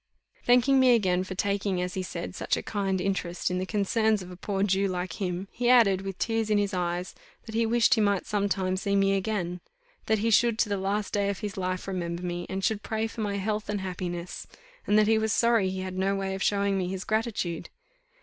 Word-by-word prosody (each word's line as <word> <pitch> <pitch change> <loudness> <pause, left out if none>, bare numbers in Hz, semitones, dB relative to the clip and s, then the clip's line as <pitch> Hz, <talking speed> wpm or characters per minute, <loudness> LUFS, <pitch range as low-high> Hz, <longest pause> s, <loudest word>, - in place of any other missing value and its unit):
Thanking 250 +2 +4
me 255 -2 +6
again 185 -4 +1
for 185 0 -6
taking, 200 -1 0
as 180 0 -2
he 190 - -2
said, 180 -1 -5
such - - -1
a - - -4
kind 195 -3 -1
interest 180 -2 -1
in 180 - -1
the 185 - -3
concerns 215 0 +1
of 180 - -10
a - - -8
poor 195 +1 -2
Jew 195 0 +2
like 180 0 -4
him, 180 0 -2
he 245 0 0
added, 215 -7 +5
with 195 -1 -5
tears 225 0 0
in 210 - +3
his 205 -1 0
eyes, 180 0 -2 0.3
that 220 - -8
he 230 0 +2
wished 235 +2 +4
he 225 - +2
might 200 -2 +1
some 205 -1 0
time 185 -1 0
see 200 +1 0
me 195 0 +3
again: 185 -3 -2 0.5
that 220 - +3
he 225 +2 0
should 230 +1 +4
to 230 -2 +1
the 200 - 0
last 200 +2 -2
day 200 -1 +1
of 200 0 -4
his 205 -2 -4
life 185 0 -3
remember 175 -2 -3
me, 175 0 -3
and 190 0 -3
should 215 -2 0
pray 220 0 -2
for 225 0 -5
my 200 -1 -1
health 210 +1 -2
and 205 -1 -1
happiness, 180 -1 -5 0.4
and 210 - +4
that 215 - +5
he 220 +1 +3
was 220 0 0
sorry 230 -5 +3
he 190 0 -4
had 185 0 -4
no 195 +1 +1
way 195 -1 -2
of 190 - -5
showing 200 -1 +1
me 180 - -1
his 185 +1 -4
gratitude. 215 -7 -2
195 Hz, 235 wpm, -27 LUFS, 185-215 Hz, 0.5 s, me